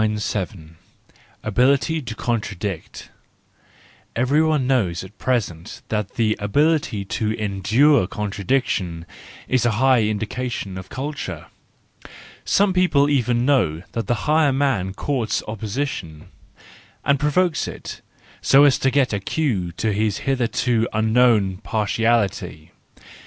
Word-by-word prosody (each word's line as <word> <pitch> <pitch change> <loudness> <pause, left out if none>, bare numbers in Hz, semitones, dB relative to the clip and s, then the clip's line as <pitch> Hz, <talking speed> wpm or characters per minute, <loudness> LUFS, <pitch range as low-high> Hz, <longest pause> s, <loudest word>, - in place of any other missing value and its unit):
Ability 135 +8 +2
to 120 -5 -7
Contradict 105 -7 -4 1.0
—Everyone 145 +3 +2
knows 100 -11 0
at 95 +2 -14
present 95 -10 -2
that 105 -2 -2
the 110 -2 +1
ability 140 -1 +1
to 110 +2 -2
endure 110 +5 +2
contradiction 100 -4 -2 0.4
is 130 -1 +1
a 120 -2 +2
high 130 -1 +4
indication 110 -1 -3
of 95 0 -8
culture. 140 +2 -5 1.0
Some 200 -1 +2
people 150 -6 +3
even 125 -3 +1
know 90 - +1
that 115 - -4
the 120 - +2
higher 155 -1 +3
man 130 -9 0
courts 125 -4 -1
opposition, 110 - -5 0.8
and 140 -1 +3
provokes 155 +3 +1
it, - - -8 0.4
so 140 +1 +6
as 145 -2 +4
to 135 - +2
get 135 -3 +1
a 100 - 0
cue 100 - -1
to 110 +4 -1
his 105 0 0
hitherto 120 -3 +1
unknown 110 -3 +3
parti¬ 110 +1 -2
ality. 100 -8 -1
115 Hz, 115 wpm, -22 LUFS, 100-135 Hz, 1.0 s, so